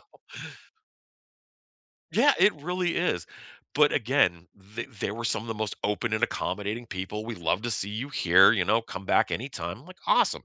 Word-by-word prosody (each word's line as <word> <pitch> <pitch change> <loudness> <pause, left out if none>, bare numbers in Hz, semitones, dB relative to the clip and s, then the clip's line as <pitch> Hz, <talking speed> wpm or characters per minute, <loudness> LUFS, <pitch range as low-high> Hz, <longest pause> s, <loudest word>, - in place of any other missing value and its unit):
So - - -25 1.9
Yeah, 290 - +5
it 210 - +6
really 180 +1 -1
is, 170 - -1 0.5
but, 150 0 +5
again, 105 -10 +1 0.3
th 115 - -3
they - - -1
were 115 +3 -6
some 110 - 0
of 115 - -10
the 115 - -2
most 110 -1 -3
open 105 +2 -1
and 110 - 0
accommodating 105 0 -2
people, 105 +1 -5
"We'd 115 -3 -6
love 90 +4 0
to 120 - -2
see 100 -2 -2
you 115 +7 -5
here," 95 - +6
you 95 -6 0
know? 110 +2 +3
"Come 95 -3 -8
back - - +3
anytime," 110 - -5
like, 185 0 -13
"Awesome." - - +2
110 Hz, 180 wpm, -27 LUFS, 95-135 Hz, 1.9 s, it